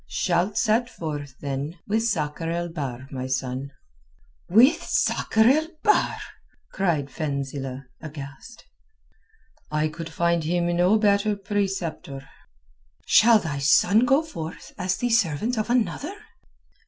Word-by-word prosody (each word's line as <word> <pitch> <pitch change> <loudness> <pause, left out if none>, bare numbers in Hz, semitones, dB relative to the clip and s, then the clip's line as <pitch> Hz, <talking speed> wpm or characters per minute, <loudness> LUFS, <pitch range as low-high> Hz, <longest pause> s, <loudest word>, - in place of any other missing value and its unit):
"Shalt 180 +3 0
set 235 +2 +2
forth, 145 - -6
then, 140 +4 -4
with 220 +2 0
Sakr 165 -7 -1
el 170 +1 -2
Bahr, 135 -6 -5
my 130 -1 -4
son." 130 +1 -3 0.8
"With 230 - +5
Sakr 220 - +1
el 305 +5 +4 0.2
Bahr?" 420 - +3 0.5
cried 160 -8 -1
Fenzilch 140 -3 -4 0.2
aghast. 150 - -10 1.0
"I 150 +1 0
could 165 +1 -7
find 170 0 0
him 175 +2 0
no 180 +5 +4
better 205 0 +2
preceptor." 190 -8 -3 0.8
"Shall 230 0 +6
thy 145 -8 -3
son 180 +8 +4
go 270 +5 +3
forth 165 - -8
as 185 +1 -1
the 245 -1 -1
servant 225 - +1
of 215 - -2
another?" 255 - 0
170 Hz, 120 wpm, -24 LUFS, 145-215 Hz, 1.0 s, Shall